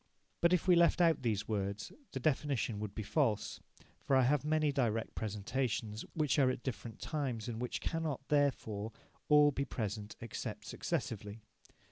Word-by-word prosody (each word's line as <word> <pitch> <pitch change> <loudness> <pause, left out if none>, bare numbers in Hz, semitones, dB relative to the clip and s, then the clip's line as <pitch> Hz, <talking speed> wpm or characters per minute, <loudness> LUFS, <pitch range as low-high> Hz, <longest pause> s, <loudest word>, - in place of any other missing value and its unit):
But 170 - +5
if 180 0 +2
we 180 - +7
left 170 +1 +5
out 165 -2 +4
these 110 -5 0
words, 100 -1 -2 0.2
the 130 - -3
definition 130 -6 0
would 105 -1 -5
be 110 - -3
false, 110 -2 0 0.4
for 135 - +1
I 130 - +6
have 140 +2 +3
many 155 -1 +2
direct 115 -5 0
presentations 110 +1 -2
which 150 -2 +2
are 135 -2 +5
at 125 - -3
different 115 -3 -5
times, 130 -8 -2
and 115 -1 -4
which 125 - -3
cannot, 155 -5 -2
therefore, 115 -7 +1 0.4
all 150 0 +7
be 140 0 -1
present, 105 -4 -4
except 115 -2 -5
successively. 105 0 -3
125 Hz, 160 wpm, -34 LUFS, 110-145 Hz, 0.4 s, we